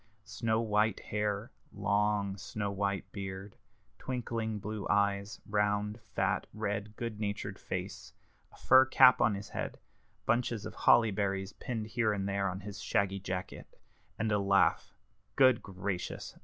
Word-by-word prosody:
Snow 110 +1 0
white 105 -2 +1
hair, 105 +1 -2 0.2
long 100 0 +1
snow 100 +1 -4
white 100 -1 -2
beard, 95 0 -6 0.4
twinkling 115 -4 -3
blue 105 0 -5
eyes, 100 0 +1
round, 105 +1 0
fat, 105 - -1
red, 105 0 -3
good 115 -2 -5
natured 100 -1 -3
face, 95 +2 -5 0.4
a - - -17
fur 130 +1 +7
cap 130 -1 +6
on 105 - +3
his 100 +1 -7
head, - - -4 0.5
bunches 120 -2 0
of - - -6
holly 115 -2 +5
berries 95 -1 -2
pinned 115 -3 -4
here 110 0 +1
and 100 -1 -2
there 100 -1 0
on 95 +2 -5
his 100 0 -8
shaggy 100 -2 0
jacket, 95 0 -6 0.4
and 110 0 0
a 105 - +3
laugh 100 -3 +2 0.4
good 130 -3 +5
gracious! 95 -1 -5
105 Hz, 140 wpm, -32 LUFS, 100-110 Hz, 0.5 s, fur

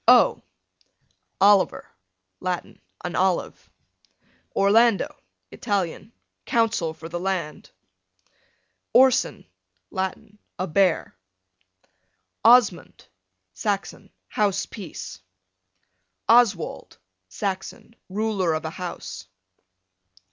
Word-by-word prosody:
O - - +6 1.0
Oliver, 200 0 +4 0.5
Latin, 180 -1 -4 0.2
an 175 -1 -4
olive. 185 -1 0 0.9
Orlando, 215 +2 +3 0.4
Italian, 200 -1 -3 0.3
counsel 220 -9 0
for 160 - -9
the 175 +1 -5
land. 185 -4 -3 1.2
Orson, 260 0 +4 0.5
Latin, 190 +2 -4 0.2
a 185 - -1
bear. 180 - +1 1.3
Osmund, 230 -4 +4 0.5
Saxon, 200 - -3 0.2
house 205 -3 0
peace. 155 - -8 1.1
Oswald, 225 -7 +2 0.3
Saxon, 195 - -5
ruler 195 -4 0
of 155 - -4
a 160 - -3
house. 175 - -7
190 Hz, 75 wpm, -24 LUFS, 175-215 Hz, 1.3 s, O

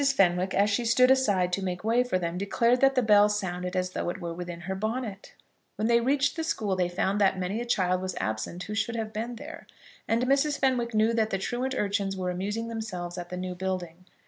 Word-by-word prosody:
Fenwick, 180 -1 +2
as 205 +2 +3
she 220 +4 +1
stood 250 +2 +5
aside 200 -9 +2
to 195 - 0
make 180 0 -3
way 230 +3 +3
for 245 -7 0
them, 170 -1 -3
declared 235 +6 +1
that 270 0 +5
the 255 - +3
bell 210 -1 +6
sounded 180 -3 -3
as 185 0 -1
though 175 - -2
it 180 - -5
were 170 -2 -4
within 175 0 -6
her 190 +2 -4
bonnet. 215 0 -4 0.4
When 215 +2 -1
they 235 0 +4
reached 270 +3 +1
the 325 - -2
school 215 - -1
they 180 -1 0
found 195 +3 0
that 190 -1 +3
many 190 +5 -2
a - - -4
child 185 -6 +1
was 185 -1 -4
absent 110 +12 -3
who 210 - -6
should 225 +2 -1
have 220 -1 -4
been 230 +3 -4
there, - - -10 0.4
and 230 +2 +1
Mrs. 280 +2 +2
Fenwick 245 -4 0
knew 220 +2 +3
that 220 -1 +1
the 195 - 0
truant 250 +6 -2
urchins 200 -1 -1
were 180 -1 -2
amusing 205 +5 -3
themselves 195 -7 -5
at 175 0 -7
the 180 - -5
new 180 0 -4
building. 180 -1 -4
200 Hz, 230 wpm, -27 LUFS, 180-235 Hz, 0.4 s, bell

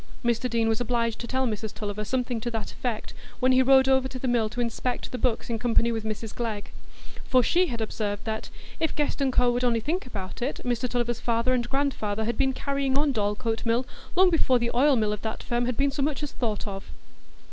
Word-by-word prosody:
Mr 235 +1 +1
Deane 230 -1 +1
was 225 +1 +1
obliged 230 -1 0
to 235 - -5
tell 260 +1 +1
Mrs 220 -2 -3
Tulliver 210 0 -3
something 245 +1 -1
to 240 - -2
that 225 -2 -4
effect, 235 -4 -4 0.3
when 255 +1 +4
he 255 0 +5
rode 265 0 +6
over 265 -1 +3
to 265 - -7
the 255 - -3
mill 235 -3 +2
to 240 +2 -7
inspect 240 +1 -2
the 250 - -4
books 245 -3 0
in 230 -2 -2
company 235 0 +3
with 225 -1 -2
Mrs 220 0 -4
Glegg; 220 -4 -4 0.5
for 255 -1 +4
she 360 +6 +3
had 235 -6 -4
observed 205 -2 -2
that 220 -1 -3 0.3
"if 320 - 0
Guest 295 -1 -1
&Co. 250 -1 +4
would 245 +1 -1
only 235 -2 +3
think 310 - -2
about 195 -4 -6
it, 265 +5 -2
Mr 245 0 0
Tulliver's 240 -1 -1
father 235 +2 +1
and 240 -1 0
grandfather 220 -7 -1
had 235 +1 -1
been 265 +1 +2
carrying 275 0 -1
on 290 0 +3
Dorlcote 220 +1 -1
Mill 235 +2 +1 0.3
long 370 0 +6
before 260 -6 +3
the 235 0 -1
oil 275 +3 +5
mill 215 -3 +1
of 210 - -5
that 220 -1 -4
firm 240 0 0
had 250 - -2
been 280 0 +2
so 280 - -3
much 295 +1 0
as 295 - -3
thought 220 -4 -2
of." 195 -2 -6
240 Hz, 230 wpm, -26 LUFS, 225-260 Hz, 0.5 s, rode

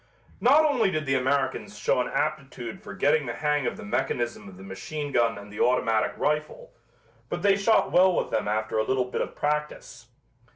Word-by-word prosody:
Not 290 +6 +5
only 260 -9 +2
did 155 -3 -2
the 135 - 0
Americans 135 +8 -1
show 125 - +1
an - - -2
aptitude 135 -6 -3
for - - -9
getting 145 0 +2
the 120 - -3
hang 150 -3 0
of - - -3
the - - -9
mechanism 120 -1 -2
of 90 - -14
the 95 - -11
machine 145 +10 -6
gun 115 -3 +2
and 100 0 -11
the 105 - -8
automatic 115 -3 +2
rifle, 150 +1 -2 0.6
but 175 - -4
they 200 -1 +5
shot 205 +3 +2
well 185 0 +5
with - - -1
them - - -1
after 110 +1 -1
a - - +2
little 130 +2 0
bit 125 - -3
of - - -4
practice. 150 -5 -3
135 Hz, 200 wpm, -26 LUFS, 115-155 Hz, 0.6 s, Not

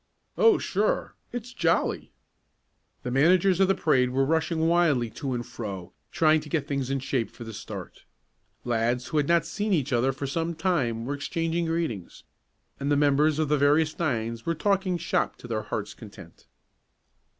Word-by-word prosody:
"Oh, 455 - +5
sure. - - -1 0.2
It's 245 +1 -6
jolly." 165 -7 0 0.9
The 125 - -3
managers 180 +7 +4
of 195 - +5
the 195 - +3
parade 130 -7 +2
were 135 +2 +1
rushing 160 +1 +1
wildly 155 -9 +2
to 130 +1 -4
and 120 -1 -4
fro, 100 -7 -7 0.2
trying 155 -1 +3
to 150 - -11
get 150 -3 -1
things 140 -3 -2
in 135 - 0
shape 130 -3 -1
for - - -11
the 115 -1 -8
start. 100 -3 -8 0.6
Lads 120 +1 0
who 155 - -1
had 145 -1 +2
not 170 0 +3
seen 210 -1 -2
each 145 -5 0
other 125 +3 +2
for 135 +2 -5
some 165 +4 -2
time 135 -10 0
were 140 - -2
exchanging 165 +3 -2
greetings, 160 - -3 0.6
and 140 +1 -1
the 145 - +4
members 145 +1 +3
of 155 -1 +1
the 150 0 +2
various 150 +2 +3
nines 115 -7 -1
were 165 - -1
talking 190 0 +1
"shop" 165 0 -1
to - - -12
their 110 -2 -2
hearts' - - -4
content. - - -14
145 Hz, 175 wpm, -26 LUFS, 125-165 Hz, 0.9 s, Oh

